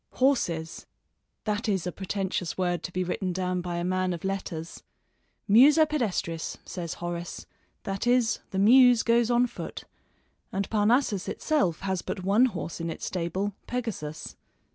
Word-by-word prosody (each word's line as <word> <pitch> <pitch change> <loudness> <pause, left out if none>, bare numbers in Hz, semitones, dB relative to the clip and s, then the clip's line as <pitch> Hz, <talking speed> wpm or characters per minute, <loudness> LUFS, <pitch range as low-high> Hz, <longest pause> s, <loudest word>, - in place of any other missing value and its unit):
Horses! 175 -12 0 0.6
That 215 +1 -1
is 190 -4 0
a 180 - -2
pretentious 190 -2 -3
word 175 -3 0
to 170 - -6
be 185 +1 -1
written 180 +1 -2
down 180 0 -1
by 175 -1 -4
a 170 - -2
man 185 0 0
of 170 - -7
letters! 185 -4 -4 0.7
Musa 285 +9 +7
pedestris, 205 - -2
says 170 -3 -5
Horace; 175 0 -5 0.4
that 195 +4 -3
is, 245 -2 +3
the 190 - -4
Muse 245 +3 +6
goes 235 0 +3
on 240 0 +4
foot, 240 - -7 0.7
and 195 +1 -2
Parnassus 215 -2 +2
itself 195 - 0
has 190 -2 -1
but 185 - -5
one 205 +6 +4
horse 170 -7 -4
in 165 - -2
its - - -5
stable, 185 +3 -2
Pegasus. 210 -11 -4
190 Hz, 150 wpm, -27 LUFS, 175-230 Hz, 0.7 s, Musa